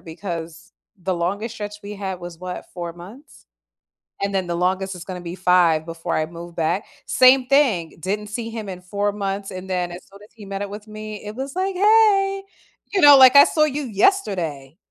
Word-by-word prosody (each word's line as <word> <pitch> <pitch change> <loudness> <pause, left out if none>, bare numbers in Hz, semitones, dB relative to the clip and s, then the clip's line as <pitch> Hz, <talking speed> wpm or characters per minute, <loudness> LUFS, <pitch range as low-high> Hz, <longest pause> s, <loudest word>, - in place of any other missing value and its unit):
because 165 -1 -7 0.3
the 185 +1 -1
longest 200 +7 -3
stretch 205 -1 -6
we 205 - -6
had 190 -2 -5
was 175 -1 -9
what, 180 0 -6
4 170 -1 -5
months? 195 - -14 0.8
And 200 0 -1
then 190 -2 0
the 170 - -2
longest 190 +2 -1
is 175 - -9
gonna 180 -1 -7
be 170 0 -6
5 175 -4 +3
before 165 0 -4
I 155 - 0
move 170 +1 -10
back. 170 +4 -1 0.2
Same 255 0 +5
thing, 250 - +2
didn't 205 +5 -3
see 230 +2 -5
him 220 -3 -6
in 180 -1 -7
4 200 +3 -2
months 195 -1 -4
and 185 0 -8
then 180 -1 -1
as 175 +1 -9
soon 200 - -15
as 210 - -19
he 210 -2 -12
met 195 0 -5
up 205 - -4
with 210 +2 -9
me, 215 -1 -8
it 210 +1 -7
was 270 +1 -6
like, 380 +1 -1
"Hey!" 390 -1 +4 0.5
You 385 - +2
know, 290 -2 +9
like, 260 0 +8
I 280 - +11
saw 305 - +2
you 295 -1 -1
yesterday. 190 - 0
195 Hz, 205 wpm, -22 LUFS, 175-230 Hz, 0.8 s, I